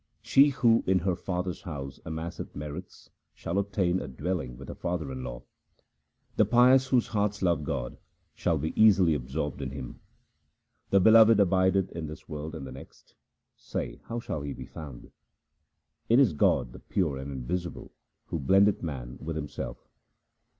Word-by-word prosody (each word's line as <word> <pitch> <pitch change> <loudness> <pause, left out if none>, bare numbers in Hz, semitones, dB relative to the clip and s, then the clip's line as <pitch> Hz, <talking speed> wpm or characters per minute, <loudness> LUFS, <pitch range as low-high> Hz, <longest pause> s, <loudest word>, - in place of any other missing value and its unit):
She 140 +2 +6
who 120 -5 +3
in 95 0 +4
her 90 0 0
father's 90 0 -3
house 70 -9 -7
amasseth 80 +2 -6
merits 75 +5 -8 0.2
shall 85 +4 -2
obtain 95 -2 0
a 75 - -6
dwelling 65 -2 -4
with 70 +1 -10
her - - -6
father 85 -5 -3
in 65 -1 -6
law. 60 0 -7 0.9
The - - +5
pious 130 +2 +5
whose 125 -3 +2
hearts 105 -2 -1
love 85 -5 +2
God 65 -4 -4 0.3
shall 85 -3 0
be 80 +2 -3
easily 95 -6 +5
absorbed 70 +1 -3
in 65 - -3
Him. 65 -2 -8 0.9
The 100 - +5
Beloved 110 +2 +7
abideth 95 0 +3
in 80 -2 -5
this 75 - -10
world 75 0 -6
and 70 - -6
the 65 - -8
next; 65 +1 -13 0.4
say - - -5
how 115 - -4
shall 75 -9 -4
He 70 -1 -4
be 65 0 -8
found? 70 -1 -10 1.0
It 115 - +6
is 130 - +5
God 65 -4 +2
the - - -10
pure 80 -8 -1
and 65 +1 -6
invisible 85 +7 -4 0.3
who 85 - -4
blendeth 95 +8 +4
man 65 -7 -6
with 80 +1 -4
Himself. 75 -2 -6
85 Hz, 165 wpm, -28 LUFS, 70-95 Hz, 1.0 s, Beloved